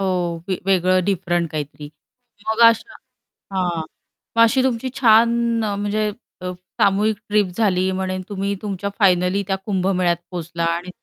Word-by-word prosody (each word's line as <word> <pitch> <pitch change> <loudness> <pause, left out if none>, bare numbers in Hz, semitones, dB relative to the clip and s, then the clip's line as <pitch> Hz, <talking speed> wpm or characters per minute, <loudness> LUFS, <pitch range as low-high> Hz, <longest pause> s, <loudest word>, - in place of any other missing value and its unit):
हो - - 0 0.4
वे 185 - -1
वेगळं, 185 -1 +3
डिफरंट 175 -3 0
काहीतरी. 150 -1 -6 0.6
मग 220 +1 -1
अशा 230 - -1 0.6
हां. 175 -3 0 0.6
मग - - +6
अशी 255 +3 +3
तुमची 260 0 -1
छान 230 -2 +5 0.4
अ, 205 - -1
म्हणजे 205 +1 -1 0.3
अ, 180 0 -3 0.3
सामूहिक 205 +2 +3
ट्रिप 210 -1 +3
झाली 190 -4 +2
म्हणे 185 0 -2
तुम्ही 200 0 -2
तुमच्या 200 -1 -3
फायनली 185 0 +3
त्या 195 - +1
कुंभमेळ्यात 185 -3 +1
पोहोचला 170 -1 -4
आणि 175 +2 -6
195 Hz, 140 wpm, -21 LUFS, 180-210 Hz, 0.6 s, मग